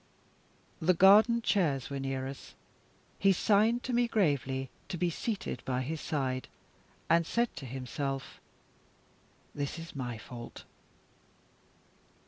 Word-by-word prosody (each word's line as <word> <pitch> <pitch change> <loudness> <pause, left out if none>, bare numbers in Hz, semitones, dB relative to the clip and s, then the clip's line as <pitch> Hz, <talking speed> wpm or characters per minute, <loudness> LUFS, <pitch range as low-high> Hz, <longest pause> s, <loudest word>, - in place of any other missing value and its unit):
The 175 +3 +4
garden 215 +6 +6
chairs 145 - +1
were 140 - -3
near 135 -1 -2
us. 135 0 -9 0.6
He 195 - +5
signed 220 +5 +3
to 255 - -3
me 240 0 +3
gravely 135 - 0 0.2
to 175 - -3
be 175 0 +1
seated 195 - -3
by 130 -1 -1
his 155 +4 -4
side, 130 -5 -2 0.6
and 170 0 +4
said 235 +8 0
to 135 - -6
himself: 135 +2 -4 1.1
"This 145 +2 -3
is 165 -1 -9
my 120 -4 -4
fault." 120 +2 -9
150 Hz, 120 wpm, -31 LUFS, 130-195 Hz, 1.1 s, garden